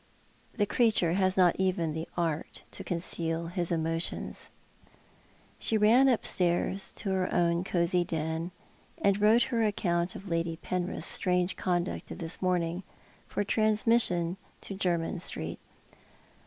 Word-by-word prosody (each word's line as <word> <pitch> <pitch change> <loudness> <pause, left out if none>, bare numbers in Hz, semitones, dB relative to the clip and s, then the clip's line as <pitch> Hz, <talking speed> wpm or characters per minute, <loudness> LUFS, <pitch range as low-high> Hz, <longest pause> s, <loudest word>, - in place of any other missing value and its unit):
The 205 - +2
creature 210 -7 +3
has 185 0 +2
not 180 -2 +5
even 180 -4 +1
the 160 +1 -4
art 165 -3 -2
to - - -7
conceal 165 -1 -3
his 175 -1 -2
emotions." 165 0 -2 1.1
She 220 - +2
ran 235 +6 +6
upstairs 190 -4 +1
to 195 - -3
her 185 -1 0
own 170 0 +2
cosy 175 -1 +1
den, 160 0 -2 0.5
and 200 0 +2
wrote 225 +3 +5
Tier 230 -2 +2
account 175 -4 0
of 195 - -9
Lady 165 -1 -1
Penrith's 180 +1 -3
strange 180 0 +1
conduct 175 -1 -2
of - - -7
this 165 -2 -5
morning, 175 -1 0 0.5
for - - -1
transmis 215 +3 +3
sion 175 +1 -2 0.2
to - - -6
Jermyn 175 -2 -1
Street. - - -3
180 Hz, 135 wpm, -29 LUFS, 170-195 Hz, 1.1 s, ran